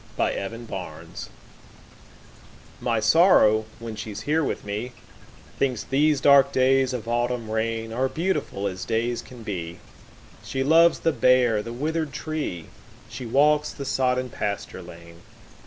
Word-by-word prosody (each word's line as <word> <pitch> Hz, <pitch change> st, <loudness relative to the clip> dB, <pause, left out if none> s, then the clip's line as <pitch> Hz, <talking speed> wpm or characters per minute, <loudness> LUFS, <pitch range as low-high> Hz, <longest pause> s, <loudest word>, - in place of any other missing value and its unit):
My -, -, +1 dB
November 100 Hz, -2 st, -6 dB
Guest -, -, -9 dB, 1.5 s
MY 115 Hz, -2 st, 0 dB
Sorrow, 110 Hz, -, +5 dB
when 115 Hz, -1 st, -7 dB
she's 105 Hz, -1 st, -6 dB
here 155 Hz, +6 st, +1 dB
with -, -, -3 dB
me, 105 Hz, +5 st, -4 dB, 0.7 s
Thinks 130 Hz, -4 st, 0 dB
these 145 Hz, +2 st, +2 dB
dark 140 Hz, 0 st, +6 dB
days 130 Hz, 0 st, +3 dB
of 120 Hz, -3 st, -5 dB
autumn 120 Hz, 0 st, -1 dB
rainAre 115 Hz, +3 st, -1 dB
beautiful 165 Hz, -, -2 dB
as 95 Hz, -2 st, -3 dB
days 115 Hz, +1 st, -1 dB
can 125 Hz, -2 st, -13 dB
be; 90 Hz, -5 st, -5 dB, 0.7 s
She 135 Hz, 0 st, -2 dB
loves 165 Hz, +4 st, +5 dB
the 165 Hz, -, +2 dB
bare, 125 Hz, -4 st, +3 dB
the 115 Hz, -, -7 dB
withered 155 Hz, +4 st, -2 dB
tree; 150 Hz, -, -4 dB, 0.4 s
She 125 Hz, -, -7 dB
walks 150 Hz, +4 st, +3 dB
the 140 Hz, -, -7 dB
sodden 130 Hz, -1 st, 0 dB
pasture 100 Hz, -3 st, -4 dB
lane. 85 Hz, -1 st, -13 dB
120 Hz, 135 wpm, -24 LUFS, 110-140 Hz, 1.5 s, dark